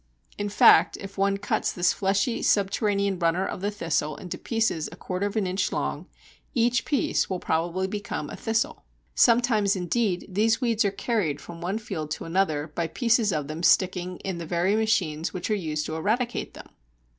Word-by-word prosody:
In 205 0 -3
fact 205 - +6
if 195 0 -9
one 195 0 +1
cuts 200 - -1
this 180 0 +2
fleshy 200 +4 0
subterranean 200 -1 +1
runner 170 +2 +1
of - - -5
the 200 - 0
Thistle 165 -6 -1
into 180 - -7
pieces 225 -9 -1
a - - -9
quarter 185 +2 -3
of 205 - -7
an 215 -3 +1
inch 185 +2 -1
long, - - -3 0.5
each 240 0 +2
piece 280 -6 0
will 190 - -1
probably 175 +4 -1
become 200 -6 -4
a - - -6
Thistle. 225 0 -1 0.3
Sometimes 230 -4 +4
indeed 185 +1 -1
these 220 +4 +2
weeds 230 -3 +1
are 200 - +2
carried 195 - -1
from 170 +3 -10
one 185 +5 -2
field 185 -9 -5
to - - -4
another 165 -4 0
by 170 +1 -1
pieces 230 0 +2
of 150 -4 -2
them 155 +2 -5
sticking 180 0 +2
in 190 -3 -4
the 170 - -5
very 175 +5 +1
machines 185 -7 0
which 180 +4 -3
are - - +4
used 155 -6 -2
to 155 - -4
eradicate 235 +9 -1
them. - - -11
195 Hz, 185 wpm, -26 LUFS, 170-215 Hz, 0.5 s, fact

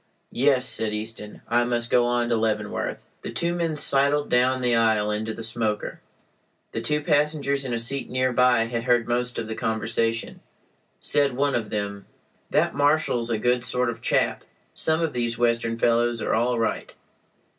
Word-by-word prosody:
"Yes," 130 0 +2
said 110 -1 +1
Easton, 105 -1 -7
"I 120 +1 +2
must 120 -1 -1
go 120 -1 +4
on 120 0 +1
to 120 - +2
Leavenworth." 110 -2 -2 0.2
The - - -6
two 170 0 -1
men 170 -2 -1
sidled 145 0 +2
down 130 +1 +3
the 120 -1 +2
aisle 110 -2 +2
into 110 +1 -2
the 115 +1 -7
smoker. 110 -2 -3 0.7
The - - -4
two 150 0 0
passengers 145 -2 +1
in 130 - -4
a 120 - 0
seat 125 +4 -2
near 130 0 0
by 125 -2 +4
had 115 0 -4
heard 120 -2 +2
most 120 +1 -1
of 115 - -2
the 110 - -5
conversation. 115 +1 -1 0.6
Said 140 -2 +2
one 140 +2 0
of 110 -3 -2
them: 100 -1 -4 0.4
"That - - +2
marshal's 145 -5 +1
a 115 - +1
good 120 +2 +1
sort 125 0 +1
of 115 0 -11
chap. - - 0 0.3
Some 160 +1 0
of 160 - -1
these 120 -1 -1
Western 115 -1 0
fellows 120 0 +2
are - - -1
all 120 +2 +1
right." 115 - -2
120 Hz, 175 wpm, -24 LUFS, 115-130 Hz, 0.7 s, go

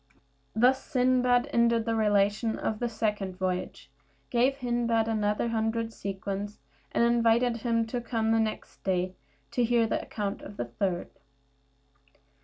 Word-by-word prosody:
Thus 255 +4 +4
Sindbad 250 -1 +2
ended 235 -1 +3
the 230 - 0
relation 210 +1 +2
of 215 - -2
the 240 - -1
second 210 -4 -2
voyage, 185 -1 -3 0.4
gave 255 +3 +3
Hindbad 240 -3 +1
another 210 +1 0
hundred 225 0 -1
sequins, 200 +1 -4 0.3
and - - +2
invited 235 0 +3
him 230 0 0
to 240 +2 -3
come 225 -2 0
the 225 - +3
next 220 -1 -3
day 185 -1 0 0.4
to 245 - +1
hear 235 0 +3
the 220 - -1
account 205 -2 -4
of 205 - -10
the 120 - -2
third. 175 +9 -2
225 Hz, 140 wpm, -28 LUFS, 205-235 Hz, 0.4 s, Thus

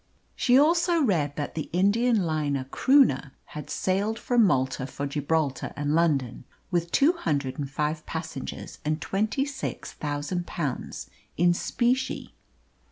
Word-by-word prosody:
She 250 0 +4
also 335 +4 +4
read 155 - +1
that 145 - -4
the 155 - -4
Indian 205 +4 +3
liner 150 -4 -1
Croonah 150 - +3
had 150 -2 -8
sailed 200 +4 0
from 245 -1 +3
Malta 130 -4 0
for 140 +1 -5
Gibraltar 145 0 -1
and 145 0 -1
London, 145 -8 +1 0.3
with 170 -1 0
two 295 +5 +4
hundred 145 - -2
and 140 -2 -3
five 150 +2 -2
passengers 160 -5 -6
and 155 +1 -1
twenty 215 +10 0
six 280 -2 -5
thousand 150 +4 -3
pounds 145 -7 -4 0.3
in 175 +1 +4
specie. 250 +8 -1
160 Hz, 135 wpm, -26 LUFS, 145-225 Hz, 0.3 s, She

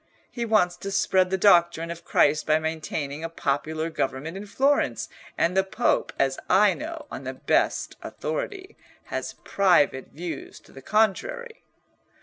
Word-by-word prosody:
He 235 -2 -3
wants 205 -6 +2
to 195 - -6
spread 190 -1 +2
the 190 - 0
doctrine 170 -4 +4
of 170 0 -8
Christ 150 -1 +2
by 155 0 +4
maintaining 155 -2 -4
a 165 - -3
popular 155 +1 -2
government 145 +4 -3
in 200 +2 -7
Florence, 275 +7 +1 0.3
and 170 +2 +1
the 190 - +4
Pope, 205 +5 0
as 135 -1 +1
I 195 +1 +5
know, 320 -1 -7
on - - -6
the - - -5
best - - 0
authority, 410 -4 -5 0.4
has - - -3
private 170 -9 +3
views 165 -1 -7
to - - -20
the 135 - -12
contrary." 440 - 0
180 Hz, 150 wpm, -25 LUFS, 160-215 Hz, 0.4 s, I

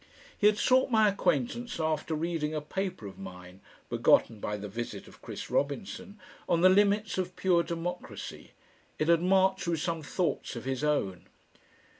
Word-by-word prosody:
He 205 - +4
had 210 0 +4
sought 260 +4 +3
my 220 -3 +5
acquaintance 200 - -1
after 160 0 -1
reading 155 -1 -2
a - - 0
paper 185 - -4
of 95 -1 -9
mine 90 -1 -10 0.3
(begotten 110 -2 +3
by 105 +1 -3
the 105 0 -6
visit 115 +4 -6
of - - -16
Chris - - -7
Robinson) 195 +7 -2 0.3
on 170 - +3
the 185 - +8
limits 205 +1 +3
of 180 -1 -3
pure 180 -2 +3
democracy. 170 +1 -6 0.4
It 155 - 0
had 170 -1 +5
marched 190 0 +3
with 165 -2 0
some 165 0 -2
thoughts 155 -2 -2
of 120 - -7
his 135 +1 -2
own. 125 -12 0
165 Hz, 165 wpm, -29 LUFS, 135-190 Hz, 0.4 s, the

